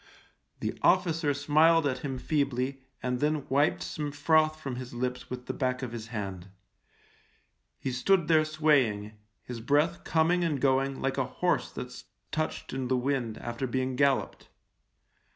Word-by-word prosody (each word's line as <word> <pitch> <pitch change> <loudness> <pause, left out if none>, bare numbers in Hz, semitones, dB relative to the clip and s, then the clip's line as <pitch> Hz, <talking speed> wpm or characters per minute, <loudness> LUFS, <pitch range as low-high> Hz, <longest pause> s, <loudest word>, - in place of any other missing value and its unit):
The - - -2
officer 165 -5 +3
smiled 155 +3 +4
at 130 -2 0
him 135 -1 -4
feebly 135 -1 -1 0.2
and 125 -1 -1
then 150 0 0
wiped 145 +4 +2
some 150 -2 -4
froth 155 +2 +3
from 135 -5 -5
his 125 -1 -7
lips 125 +1 -3
with 125 0 -6
the - - -3
back 130 0 -1
of 125 - -4
his 115 -2 -6
hand. 100 -5 -5 1.3
He 135 - -3
stood 165 +7 +2
there 160 -2 +5
swaying, 145 -10 +2 0.3
his 120 -2 -7
breath 145 +7 +1
coming 170 +2 +2
and 155 -5 0
going 135 0 +1
like 135 0 0
a - - +1
horse - - 0
that's - - -8 0.3
touched 155 0 -3
in 130 -1 -2
the 130 0 +2
wind 125 -3 -1
after 120 +2 -4
being 130 +1 -1
gal 140 0 +5
loped. - - -9
135 Hz, 160 wpm, -29 LUFS, 125-155 Hz, 1.3 s, there